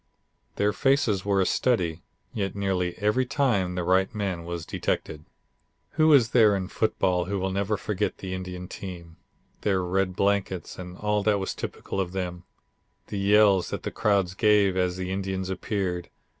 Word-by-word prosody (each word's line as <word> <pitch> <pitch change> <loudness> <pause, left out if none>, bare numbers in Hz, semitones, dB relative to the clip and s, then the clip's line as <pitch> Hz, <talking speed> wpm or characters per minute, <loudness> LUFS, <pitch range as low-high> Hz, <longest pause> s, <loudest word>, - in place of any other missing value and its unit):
Their 105 0 +1
faces 120 -5 +2
were 100 -1 +1
a - - +2
study, 90 -11 +1 0.3
yet 100 -2 -2
nearly 95 -3 -1
every 105 +5 +2
time 120 -9 0
the 90 - -1
right 95 +2 +2
man 95 -5 -2
was 85 -1 -5
detected. 75 0 -3 0.7
Who 155 0 +4
is 130 -6 +6
there 110 -4 +5
in 95 -1 -3
football 90 -5 +1
who 100 +3 -2
will 95 0 -2
ever 100 +1 0
forget 105 -1 -2
the 95 -1 -6
Indian 90 -1 -6
team, 85 -4 -9 0.4
their 95 -3 +1
red 90 +1 0
blankets 100 -3 -1
and 90 0 -8
all 105 0 0
that 105 0 +2
was 95 -1 -3
typical 95 - -4
of 90 -1 -4
them; 90 -2 -4 0.6
the 100 - -3
yells 100 -1 +4
that - - -5
the - - -3
crowds 100 -4 +1
gave 105 -2 +3
as 90 -1 0
the 95 0 -4
Indians 95 -1 -2
appeared. 90 -2 -2
95 Hz, 170 wpm, -26 LUFS, 90-105 Hz, 0.7 s, is